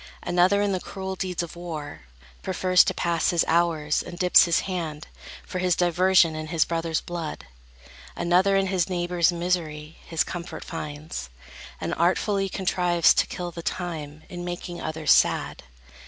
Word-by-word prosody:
Another 185 +3 +3
in 205 - +1
the 185 - 0
cruel 190 +1 -6
deeds 180 -2 -3
of 170 - -8
war 160 - -7 0.4
Prefers 185 -1 +3
to - - 0
pass 170 -1 0
his 170 -2 +2
hours, 160 -3 +1
and 175 - -9
dips 180 0 +6
his 170 -1 +2
hand, 165 -5 -4 0.4
For 185 - -5
his 180 -2 +2
diversion, 175 -1 +4
in 155 0 -5
his 160 0 +2
brother's 165 -1 -1
blood: 170 -3 -6 0.7
Another 180 +3 +3
in 195 - +2
his 185 -2 0
neighbor's 175 -1 +1
misery 165 -3 -3
His 165 -2 +1
comfort 175 -2 -7
finds, 145 - -6 0.5
and - - -3
artfully 195 +3 +1
contrives 180 -2 +2
To - - +1
kill 175 -1 -5
the 170 - -7
time, 155 -4 -5
in 175 -2 -7
making 175 0 -6
others 155 -1 -1
sad. - - +3
175 Hz, 155 wpm, -25 LUFS, 160-180 Hz, 0.7 s, dips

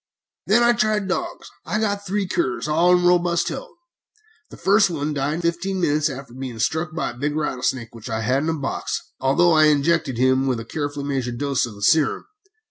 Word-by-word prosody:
"Then 220 +4 +4
I 240 0 +5
tried 215 -3 0
dogs. 185 - -4
I 215 - -2
got 205 -2 -2
three 200 +1 -1
curs, 130 -5 -1
all 165 +4 +3
in 180 0 +3
robust 175 -1 +2
health. - - -8 0.7
The - - -12
first 200 +1 +4
one 150 -2 -2
died 140 +1 -1
in 170 - -4
fifteen 170 +3 -1
minutes 155 -3 +1
after 135 -3 -8
being 130 -2 -6
struck 160 +7 -1
by 170 - -2
a 120 - -14
big 145 +2 -1
rattlesnake 130 -5 -2
which 115 +1 -9
I 110 0 -2
had 130 +5 +1
in 155 - -1
a - - +1
box, 140 - -3 0.2
although 140 +7 +3
I 155 -1 +5
injected 150 -3 +2
him 130 +2 +2
with 125 -3 0
a 115 - -7
carefully 145 +1 -4
measured 130 -4 -2
dose 140 -2 0
of 110 - -10
the 100 - -9
serum. 150 +5 +2
150 Hz, 210 wpm, -22 LUFS, 130-175 Hz, 0.7 s, I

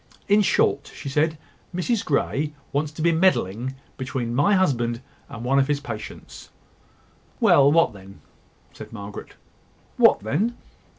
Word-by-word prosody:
"In 205 +1 +5
short," 145 -7 +1
she 140 - -6
said, 155 +3 +1 0.4
"Mrs 205 +5 0
Grey 145 +1 -1 0.2
wants 145 +1 -1
to 155 - -5
be 170 - +4
meddling 130 - +1 0.2
between 130 -3 -3
my 145 +11 +3
husband 120 -10 +1 0.3
and 115 - -8
one 135 +2 +3
of 135 - +2
his 145 -1 0
patients." 115 -7 -9 0.9
"Well, 140 0 +5
what 165 -5 +3
then?" 95 0 -14 0.5
said - - -11
Margaret. 100 -2 -9 0.6
"What - - +5
then? 180 - -1
140 Hz, 135 wpm, -23 LUFS, 120-165 Hz, 0.9 s, In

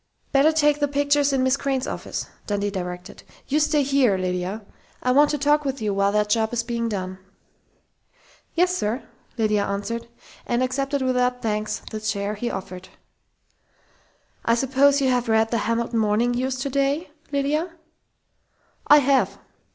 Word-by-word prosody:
Better 280 +3 +5
take 295 -2 +2
the 290 - +2
pictures 285 0 +2
in 265 -1 +1
Miss 260 +1 +3
Crain's 270 -2 -1
office," - - -4 0.2
Dundee 205 -1 -1
directed. 180 -2 -6 0.3
"You 295 - +1
stay 300 -1 +2
here, 265 -7 +3
Lydia. 185 +3 -3 0.4
I 250 - +2
want 290 +3 +5
to 295 - 0
talk 295 +1 +2
with 275 -1 -3
you 210 -2 -1
while 200 0 +2
that 210 0 +1
job 220 0 +2
is 235 -1 0
being 235 -1 -2
done." 185 -2 -4 1.4
"Yes, 360 +2 +3
sir," 230 -3 -2 0.3
Lydia 215 -2 +2
answered, 205 +4 -3 0.4
and 240 +1 +1
accepted 275 +2 -1
without 250 -1 0
thanks 215 -1 -2
the 215 - -4
chair 210 -1 -2
he 235 +3 -3
offered. 185 -2 -7 1.5
"I 230 - +3
suppose 270 +3 +3
you 265 - +2
have 245 -2 0
read 220 0 +3
The 230 - +1
Hamilton 230 0 0
Morning 220 +3 +2
News 255 +2 -1
today, 280 +4 -1 0.2
Lydia?" 295 +5 0 1.2
"I 295 - +8
have!" 275 -1 +2
250 Hz, 155 wpm, -23 LUFS, 210-280 Hz, 1.5 s, I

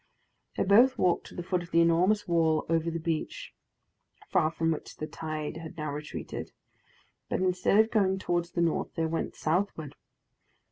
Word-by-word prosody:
They - - +2
both 235 +7 +5
walked 180 -2 +1
to - - -13
the 175 - -4
foot 180 0 -1
of 175 - -10
the 170 - +3
enormous 175 +5 +3
wall 165 -2 +2
over 165 0 +1
the 165 - -3
beach, 165 -1 -3 0.8
far 155 - +3
from 165 0 0
which 155 - -5
the 155 - -4
tide 155 -1 -5
had 165 +1 -9
now 155 -2 -3
retreated; 150 +1 -6 0.8
but - - 0
instead 185 +1 +2
of 220 +1 +4
going 190 -3 +2
towards 175 -2 -2
the 170 - 0
north, 165 -2 0
they 165 - 0
went 165 0 -2
southward. 160 -3 -1
170 Hz, 175 wpm, -29 LUFS, 160-185 Hz, 0.8 s, both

